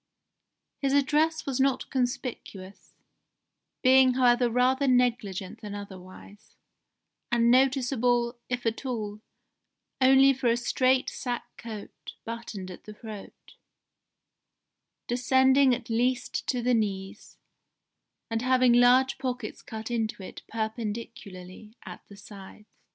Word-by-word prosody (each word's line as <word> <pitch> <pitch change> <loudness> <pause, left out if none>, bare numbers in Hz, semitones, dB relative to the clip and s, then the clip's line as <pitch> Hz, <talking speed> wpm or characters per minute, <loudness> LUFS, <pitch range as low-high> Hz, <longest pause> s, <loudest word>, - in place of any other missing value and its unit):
His 280 0 +2
dress 315 +3 0
was 270 -2 -2
not 265 -1 +1
conspicuous, 245 -6 -5 0.9
being 260 -1 +5
however 245 -1 +3
rather 255 +3 +2
negligent 235 -7 0
than 205 -1 -7
otherwise, 200 +1 -12 0.8
and 235 0 +3
noticeable, 250 -2 +2
if 245 -1 -3
at 225 +3 -2
all, 215 -5 -4 0.8
only 270 +1 +6
for 260 -1 -2
a 235 0 +3
straight 255 +2 +1
sack 245 -2 -4
coat 220 -3 -10
buttoned 225 -5 -7
at 180 - -12
the 215 - -10
throat, 215 -2 -11 1.5
descending 260 +2 +3
at - - -10
least 245 +2 -1
to 250 -2 -1
the 250 +1 +2
knees, 195 -4 -3 0.9
and 225 -1 -2
having 255 -1 +3
large 250 +2 +4
pockets 250 -4 -5
cut 220 +1 -7
into 220 -4 -2
it - - -10
perpendicularly 220 -3 -6
at - - -9
the 200 - -14
sides. 200 +1 -13
240 Hz, 110 wpm, -27 LUFS, 215-255 Hz, 1.5 s, only